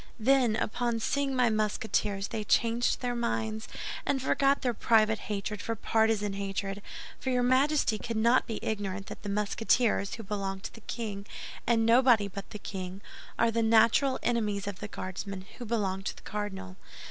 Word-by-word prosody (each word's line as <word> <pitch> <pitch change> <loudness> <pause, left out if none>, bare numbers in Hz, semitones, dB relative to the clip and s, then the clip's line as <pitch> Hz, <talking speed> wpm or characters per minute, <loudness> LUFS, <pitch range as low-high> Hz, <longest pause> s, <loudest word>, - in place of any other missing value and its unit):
"Then, 245 -1 +4
upon 230 +1 -1
seeing 275 +3 0
my 250 -3 +3
Musketeers 210 -2 0
they 215 - -3
changed 230 +3 +2
their 245 -1 -1
minds, 220 -2 -2 0.4
and 280 - 0
forgot 275 +2 +2
their 245 -2 +1
private 220 0 +3
hatred 205 0 -3
for 230 - -2
partisan 220 -2 +1
hatred; 195 0 -3 0.4
for 260 - -3
your 250 -1 +2
Majesty 260 -2 +3
cannot 230 +2 +2
be 225 - -3
ignorant 200 -2 -3
that - - -9
the 205 - -5
Musketeers, 210 +1 +1
who 225 - -8
belong 195 -1 -3
to - - -7
the 225 - -13
king 210 -3 -5 0.4
and 225 -1 +3
nobody 235 -3 +5
but 200 0 -8
the - - -7
king, 190 -1 -6 0.4
are 230 0 +3
the 230 +1 +1
natural 230 +4 +4
enemies 210 -4 0
of 200 -2 -5
the 210 - -5
Guardsmen, 190 -1 -6
who 245 - -5
belong 200 -4 -1
to 195 - -4
the - - -15
cardinal." 190 -3 -5
220 Hz, 170 wpm, -29 LUFS, 200-235 Hz, 0.4 s, nobody